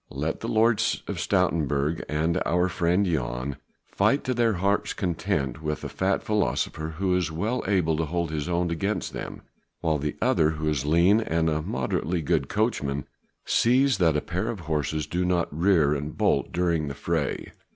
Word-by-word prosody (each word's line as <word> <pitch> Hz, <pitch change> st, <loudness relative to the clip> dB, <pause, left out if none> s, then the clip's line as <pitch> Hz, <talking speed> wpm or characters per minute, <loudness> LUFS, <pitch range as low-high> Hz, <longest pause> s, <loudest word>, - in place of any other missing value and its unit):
Let 75 Hz, +4 st, -3 dB
the 115 Hz, -, -5 dB
Lord 110 Hz, 0 st, +3 dB, 0.3 s
of -, -, -4 dB
Stoutenburg 75 Hz, 0 st, +1 dB
and 80 Hz, +4 st, 0 dB
our 90 Hz, +1 st, +2 dB
friend 90 Hz, +2 st, +1 dB
Jan 65 Hz, -5 st, -2 dB, 0.3 s
fight 110 Hz, +8 st, +1 dB
to 130 Hz, -, -1 dB
their 115 Hz, -2 st, +2 dB
heart's 100 Hz, +2 st, 0 dB
content 75 Hz, -7 st, -2 dB
with 75 Hz, -1 st, -3 dB
a -, -, -4 dB
fat 95 Hz, +1 st, 0 dB
philosopher 80 Hz, -6 st, -1 dB
who 95 Hz, -1 st, +1 dB
is 90 Hz, -4 st, 0 dB
well 105 Hz, +10 st, -1 dB
able 90 Hz, -6 st, +2 dB
to 80 Hz, -, 0 dB
hold 85 Hz, +1 st, -2 dB
his 75 Hz, +1 st, -3 dB
own 85 Hz, 0 st, 0 dB
against 100 Hz, +6 st, -2 dB
them, -, -, -7 dB, 0.4 s
while 80 Hz, -3 st, +1 dB
the 75 Hz, +1 st, -3 dB
other 75 Hz, -, +3 dB
who 80 Hz, 0 st, -2 dB
is 75 Hz, -2 st, 0 dB
lean 85 Hz, +7 st, +5 dB
and 80 Hz, -5 st, 0 dB
a 75 Hz, 0 st, 0 dB
moderately 75 Hz, +5 st, -2 dB
good 75 Hz, -3 st, 0 dB
coachman 75 Hz, -, -1 dB, 0.4 s
sees 125 Hz, -1 st, +3 dB
that 80 Hz, -4 st, +3 dB
a -, -, 0 dB
pair 90 Hz, +2 st, -3 dB
of 105 Hz, -6 st, -4 dB
horses 75 Hz, -1 st, -1 dB
do 90 Hz, +2 st, -1 dB
not 90 Hz, -4 st, 0 dB
rear 80 Hz, -4 st, +3 dB
and 75 Hz, +1 st, -4 dB
bolt -, -, +1 dB
during 85 Hz, -3 st, 0 dB
the 70 Hz, -, -5 dB
fray." 80 Hz, 0 st, -2 dB
85 Hz, 180 wpm, -26 LUFS, 75-95 Hz, 0.4 s, lean